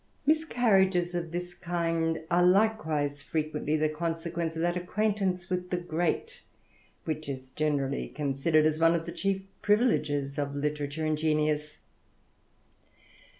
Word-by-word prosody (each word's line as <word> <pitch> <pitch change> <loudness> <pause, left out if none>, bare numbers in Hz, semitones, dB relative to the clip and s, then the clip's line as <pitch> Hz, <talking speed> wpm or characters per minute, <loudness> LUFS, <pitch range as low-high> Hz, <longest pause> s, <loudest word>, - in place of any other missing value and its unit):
Miscarriages 200 - +3
of 170 -2 -3
this 175 +1 -4
kind 165 -2 -1
are 175 +1 +4
likewise 160 -8 +2
frequently 155 0 -1
the 155 0 +2
consequence 165 +1 -3
of 160 - -2
that 175 0 +1
acquaintance 185 -1 -1
with 180 -1 -2
the 180 - 0
great, 175 - -2 0.6
which 155 -2 -3
is 130 -1 -6
generally 140 -2 -1
considered 150 +2 +1
as 155 0 +1
one 165 +1 +5
of 165 -1 -2
the - - -5
chief 195 -1 -1 0.2
privileges 150 - +1
of 140 -1 -2
litera 145 0 -1
ture 155 +2 -4
and 155 -1 0
genius. 150 -1 0
165 Hz, 135 wpm, -29 LUFS, 150-180 Hz, 0.6 s, one